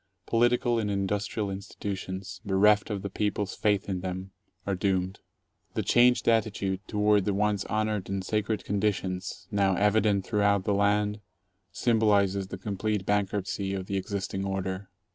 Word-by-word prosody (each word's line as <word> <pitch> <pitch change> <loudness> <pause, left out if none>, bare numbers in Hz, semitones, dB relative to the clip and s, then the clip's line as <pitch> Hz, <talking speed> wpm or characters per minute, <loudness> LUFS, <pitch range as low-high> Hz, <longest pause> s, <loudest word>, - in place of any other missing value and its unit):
Political 120 0 +2
and 105 -2 -1
industrial 100 +1 -1
insti 95 +1 -7
tutions, 95 -2 -5
bereft 105 +2 +4
of 100 -3 -3
the 100 - -3
people's 105 -1 -1
faith 105 -2 +1
in 95 -2 -2
them, 95 +1 -5 0.3
are 100 - 0
doomed. 95 0 0 0.6
The - - 0
changed 125 +1 +4
attitude 105 -4 +1
toward 105 -2 +2
the 100 - 0
once 105 -1 +1
honored 110 -3 -1
and 95 -1 -2
sacred 105 0 -1
conditions, 95 -2 -2
now 100 -2 +2
evident 105 0 +2
throughout 100 -2 +2
the 100 - +1
land, 105 +1 +2 0.5
symbolizes 100 -3 +2
the 95 - -6
complete 100 +1 -2
bankruptcy 100 -1 -1
of 95 -1 -4
the 100 +1 -2
existing 95 0 -3
order. 95 0 -3
100 Hz, 145 wpm, -28 LUFS, 95-105 Hz, 0.6 s, bereft